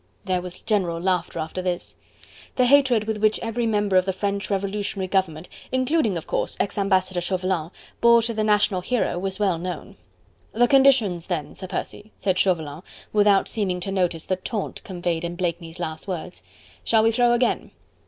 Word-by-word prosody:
There 185 -1 0
was 180 0 -8
general 185 -6 0
laughter 180 -1 -1
after 160 +4 -3
this. 180 -1 -3 0.6
The 250 - +3
hatred 260 -4 +4
which 215 0 +1
every 230 +1 -1
member 205 -3 +2
of 185 - +4
the 190 - -1
French 200 +1 -2
revolutionary 200 -1 -2
government 185 -3 -1 0.2
including, 255 - +1
of 165 - -6
course, - - -2
ex - - -1
Ambassador 190 -2 +1
Chauvelin 185 -2 -1 0.3
bore 235 0 +6
to 230 +1 -1
the 215 -1 -1
national 210 -3 +2
hero 210 -4 0
was 190 0 -3
well 190 -5 +1
known. 180 +1 -6 0.6
"The 240 +2 +4
conditions 245 -11 +4
then, 155 -6 -3
Sir 185 - -8
Percy," 205 +3 -6
said 190 -1 0
Chauvelin, 160 -5 0 0.3
without 205 -2 +4
seeming 190 -5 -1
to 195 - -3
notice 180 -4 0
the 185 - -1
taunt 205 +2 -5
conveyed 175 -3 -3
in 170 0 -3
Blakeney's 170 -1 -3
last 160 -1 -5
words. 180 -1 -5 0.4
"Shall 220 -1 +3
we 225 - +4
throw 240 +1 +3
again?" 240 +1 +1
190 Hz, 175 wpm, -24 LUFS, 180-215 Hz, 0.6 s, bore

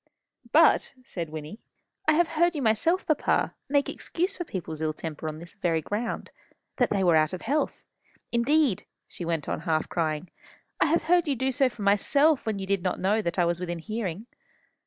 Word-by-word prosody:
"But," - - +5
said 170 -9 -5
Wynnie, 155 +6 -7 0.5
"I 310 - +6
have 335 +1 +3
heard 340 +1 +2
you 280 -4 -2
yourself, 325 - +2
papa, 310 -2 +1 0.2
make 285 0 +2
excuse 365 +4 -2
for 350 - -3
people's 165 - -6
ill 155 -1 0
temper 160 0 -6
on 155 - -7
this 170 +2 -11
very 170 -4 0
ground, 220 +7 -3 0.5
that 245 - +3
they 195 -2 +1
were 175 -3 +5
out 155 +1 +3
of 185 - -5
health. 290 +6 -1 0.5
Indeed," 255 - +2 0.2
she 175 - -7
went 165 -3 -2
on, - - -2
half 160 -1 0
crying, 160 0 -2 0.5
"I - - +4
have 330 +3 +2
heard 350 0 +3
you 280 - +1
do 260 +2 0
so 265 0 +2
for 230 -4 -8
myself, 275 +9 +3
when 215 -2 0
you 195 - -4
did 195 -1 0
not 185 0 -1
know 210 +4 +2
that 170 -3 -3
I 175 - +4
was 170 0 0
within 175 -1 -3
hearing." 210 +1 -4
205 Hz, 200 wpm, -27 LUFS, 170-280 Hz, 0.5 s, I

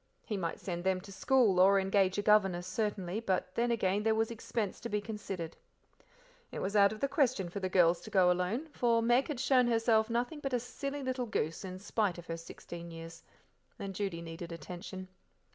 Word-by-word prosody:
He 215 - -3
might 170 -4 -3
send 175 -2 -4
them 190 0 +1
to 195 - -12
school, 205 -1 +3
or 195 +2 +6
engage 195 0 +2
a 205 - 0
governess 195 -4 +3
certainly, 200 -2 -2
but 185 -4 -1
then 240 +1 +1
again 205 -4 +1
there 220 0 +2
was 225 +1 +1
expense 220 -3 -3
to 235 - -5
be 210 - 0
considered. 200 -6 -5 1.0
It - - -6
was 200 +2 -2
out 200 -1 +6
of 215 - -7
the 275 - +2
question 255 - +1
for 200 - -5
the 185 -1 -2
girls 175 -2 +4
to - - -9
go 185 -3 +5
alone, 180 - -1
for 235 -4 +2
Meg 240 +3 +3
had 290 -5 -4
shown 255 -1 +4
herself 225 -1 +3
nothing 245 +6 -1
but 275 -2 -4
a 245 - +2
silly 275 +4 -5
little 255 -1 -2
goose, 160 -6 -2
in 185 -1 -6
spite 200 -1 -1
of 175 - -9
her 165 -1 -4
sixteen 170 +1 -9
years; 165 0 -9 0.6
and 195 -1 -5
Judy 185 -4 -3
needed 165 +1 -7
attention. 180 +2 -7
200 Hz, 205 wpm, -32 LUFS, 180-230 Hz, 1.0 s, or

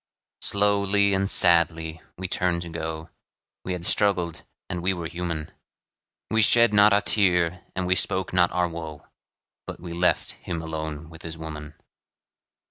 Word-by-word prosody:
Slowly 100 0 +2
and 95 0 0
sadly 85 -3 +3 0.2
we 95 +1 -4
turned 90 -1 -1
to 85 - -8
go, 80 0 -5 0.5
We 95 - -3
had 85 -1 -6
struggled, 90 -7 +1 0.3
and 90 - -4
we 95 +2 +1
were 85 -1 -6
human; 85 -2 -5 0.8
We 110 0 +3
shed 115 +1 +5
not 105 +1 +6
a 100 0 +3
tear, 90 -4 +1
and 95 0 -2
we 90 - +3
spoke 95 +1 0
not 90 -1 +3
our 90 0 +1
woe, 80 -3 -8 0.6
But - - -7
we 85 -1 -8
left 90 +1 +1
him 85 - -6
alone 80 -1 -6
with 80 -1 -12
his 80 -1 -7
woman. 75 -2 -8
85 Hz, 155 wpm, -25 LUFS, 80-95 Hz, 0.8 s, not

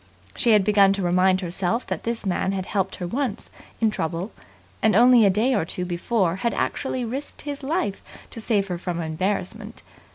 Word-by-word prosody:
She 235 - +3
had 210 -2 +5
begun 200 -1 +5
to 195 -1 -2
remind 185 +2 +3
herself 185 +6 -1
that - - -5
this 230 -1 -2
man 190 0 0
had 190 -1 -3
helped 190 -2 -1
her 180 - -5
once 235 +2 -3 0.3
in 225 -1 +2
trouble, 170 +2 -3 0.5
and 220 - +3
only 240 -2 +7
a - - +5
day 220 +7 +2
or 205 - +1
two 180 +2 -4
before 180 +1 0
had 235 +4 -1
actually 260 -2 -2
risked 270 +5 -5
his 290 -1 -5
life 270 - -2 0.3
to 225 - -5
save 205 -3 +1
her 175 -1 -3
from 175 -1 -3
embarrassment. 190 +6 -3
200 Hz, 190 wpm, -24 LUFS, 185-230 Hz, 0.5 s, only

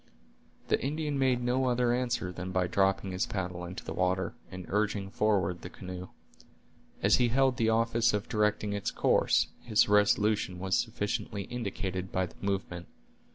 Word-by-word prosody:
The - - +1
Indian 150 0 -1
made 130 -2 +2
no 125 +2 +1
other 125 -1 +2
answer 120 -7 -1
than 90 +1 -6
by 95 -1 +1
dropping 95 +1 +1
his 90 0 -1
paddle 90 -2 -4
into 90 +2 -8
the - - -4
water, 90 0 0 0.2
and 90 -1 -8
urging 100 -1 -1
forward 95 -5 +1
the 90 - -7
canoe. 90 -1 -8 1.0
As - - +5
he 125 - +3
held 130 +1 +2
the 110 -1 +2
office 115 +1 +2
of 105 +1 -2
directing 105 -2 0
its 100 -1 -2
course, - - +2
his 110 -3 +3
resolution 105 -2 +3
was 95 +1 0
sufficiently 105 -1 -2
indicated 95 -4 -4
by 95 0 +1
the - - -13
movement. 95 -3 -3
100 Hz, 160 wpm, -30 LUFS, 95-115 Hz, 1.0 s, As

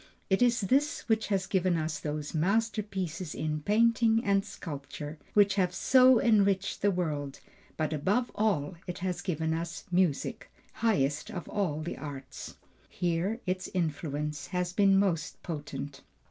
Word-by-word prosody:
It 190 - +3
is 245 -2 +4
this 275 +9 +1
which 220 -2 +1
has 195 -3 0
given 185 -2 +1
us 155 0 -2
those 150 -1 -4
masterpieces 190 -2 -1
in 155 -1 -2
painting 225 +4 +3
and 200 -1 +3
sculpture, 150 -2 -7 0.2
which 205 -1 +5
have 180 -1 0
so 255 +1 +6
enriched 200 -4 +2
the 205 - +4
world; 150 -7 -2 0.4
but 155 0 -1
above 200 - 0
all 190 -8 0
it 180 0 -4
has 180 -1 -2
given 160 -3 -1
us 170 +1 -4
music, 175 -5 0 0.2
highest 150 -10 +1
of 175 - -6
all 165 -7 -1
the 170 - -5
arts. 135 -2 -8 0.3
Here 180 +6 -1
its 185 0 -2
influence 150 -3 -2
has 180 -1 -2
been 195 -1 +5
most 175 -6 0
potent. 145 -3 -6
180 Hz, 145 wpm, -30 LUFS, 155-205 Hz, 0.4 s, so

